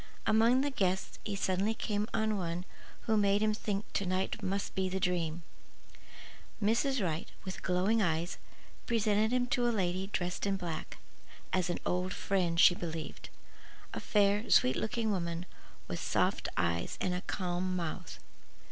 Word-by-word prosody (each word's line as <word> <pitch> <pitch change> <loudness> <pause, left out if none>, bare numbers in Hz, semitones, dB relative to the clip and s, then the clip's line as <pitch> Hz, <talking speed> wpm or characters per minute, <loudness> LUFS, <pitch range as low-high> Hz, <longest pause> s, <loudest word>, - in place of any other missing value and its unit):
Among 230 +4 +5
the 285 +1 0
guests 190 -6 -1
he 205 - -3
suddenly 195 +3 +1
came 210 -1 -1
on 220 -1 +1
one 175 -1 -3 0.4
who 220 - +1
made 200 0 +3
him 215 0 +3
think 210 -1 -2
to - - +1
night 185 +1 -1
must 195 +1 -2
be 190 -1 0
the 190 +1 -2
dream. 175 -3 0 1.2
Mrs. 230 +3 +2
Wright, 160 -2 -2 0.2
with 185 - -5
glowing 190 +5 +2
eyes, 165 -1 0 0.5
presented 220 -1 +2
him 250 0 +2
to 245 0 +2
a - - +4
lady 190 -3 0
dressed 180 0 -2
in 195 -1 +1
black, 170 -4 -5 0.6
as 185 -1 +1
"an 175 - 0
old 180 +1 0
friend, 175 -4 0
she 180 - +9
believed:" 165 -3 -6 0.6
a - - -3
fair, 205 +1 +2
sweet 130 +1 +5
looking 220 0 0
woman 170 -2 -2 0.4
with - - -4
soft - - +1
eyes 85 0 0
and 180 - 0
a 180 - -2
calm 185 -1 -2
mouth. 170 -3 -4
190 Hz, 155 wpm, -32 LUFS, 175-215 Hz, 1.2 s, she